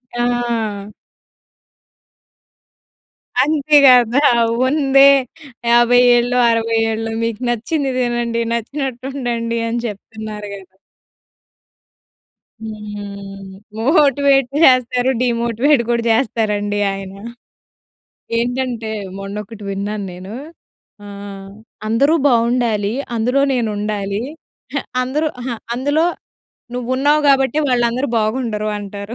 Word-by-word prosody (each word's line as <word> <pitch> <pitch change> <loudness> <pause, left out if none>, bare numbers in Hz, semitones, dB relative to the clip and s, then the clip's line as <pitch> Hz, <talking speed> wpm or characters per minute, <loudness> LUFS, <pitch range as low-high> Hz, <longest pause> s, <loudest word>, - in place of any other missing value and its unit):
ఆ! 235 -4 -1 2.6
అంతే 300 0 +3
గదా! 250 +1 +6 0.5
"ఉందే 275 -1 +5 0.6
50 240 +1 +5 0.2
ఏళ్ళో 245 +1 +1
60 230 0 0
ఏళ్ళో. 225 0 -3
మీకు 230 +1 -3
నచ్చింది 265 +4 -1
తినండి 240 -1 -1
నచ్చినట్టు 260 +2 -4
ఉండండి." 235 -3 -2
అని 235 +1 -2
జెప్తున్నారు 210 0 -7
గదా. 190 -1 -14 1.9
హ్మ్. 200 -2 -8 0.3
మోటివేట్ 280 -1 +3 0.2
చేస్తారు. 250 -2 +4
డీమోటివేట్ 235 +3 +2
గూడా 235 -1 +1
జెస్తారండి 210 -3 0
ఆయన. 195 -1 -7 1.2
ఏంటంటే 245 -1 -2 0.3
మొన్నొకటి 210 +2 -7
విన్నాను 200 +1 -3
నేను. 185 +3 -9 0.7
ఆహ్, 200 -1 -9 0.4
"అందరూ 275 +8 +3 0.2
బాగుండాలి. 230 -3 +1 0.2
అందులో 250 +5 +1
నేనుండాలి. 210 -3 -2 0.6
అహ - - -2 0.2
అందరూ 300 +5 -1
అహ 255 - -4 0.3
అందులో 290 +6 +1 0.7
నువ్వున్నావు 260 +5 +1
గాబట్టే 275 +2 +3
వాళ్ళందరూ 245 +2 +1
బాగుండరు" 215 -1 -1
అంటారు. 200 +2 -7
235 Hz, 85 wpm, -18 LUFS, 210-255 Hz, 2.6 s, గదా